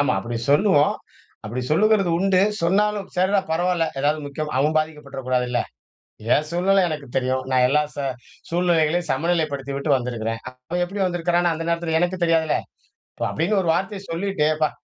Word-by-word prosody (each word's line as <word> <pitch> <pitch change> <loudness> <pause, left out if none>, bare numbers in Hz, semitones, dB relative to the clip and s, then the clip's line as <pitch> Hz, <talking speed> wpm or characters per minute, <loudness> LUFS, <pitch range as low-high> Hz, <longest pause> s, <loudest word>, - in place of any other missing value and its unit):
ஆமா, 140 -3 +2
அப்டி 115 +4 -4
சொல்லுவோம், 150 -1 +4 0.5
அப்டி 120 +4 -3
சொல்லுகிறது 195 +2 +3
உண்டு. 190 0 +3 0.2
சொன்னாலும், 205 +3 +1
சர்ரா 190 +2 +3
பரவால்ல, 175 0 +1
ஏதாவது 150 +2 +1
முக்கியம் 150 +2 -5
அவன் 150 +3 +2
பாதிக்கப்பட்டறக் 150 -4 -5
கூடாதுல்ல? 125 -1 +1 0.7
ஏன் 150 - +1
சூழ்நில 190 +3 +3
எனக்கு 150 -3 -5
தெரியும், 130 0 0
நான் 130 -1 +3
எல்லா 150 +3 +3
ச - - -8 0.5
சூழ்நிலைகளையும் 170 -1 +1
சமநிலைப்படுத்திவிட்டு 140 -2 -1
வந்துருக்கேன். 115 -3 -3
அவன் 130 +8 -4
எப்டி 195 +3 -6
வந்துருக்கான்னோ 175 -1 +1
அந்த 165 +1 -5
நேரத்துல 170 -1 0
எனக்கு 175 +1 0
தெரியாதுல? 165 -2 +2 0.7
இப் - - 0
அப்டின்னு 195 +6 0
ஒரு 170 - -1
வார்த்தைய 195 +3 -2
சொல்லிட்டு, 185 -2 -1
"அப்பா! 155 0 +1
160 Hz, 150 wpm, -22 LUFS, 140-180 Hz, 0.7 s, சொல்லுவோம்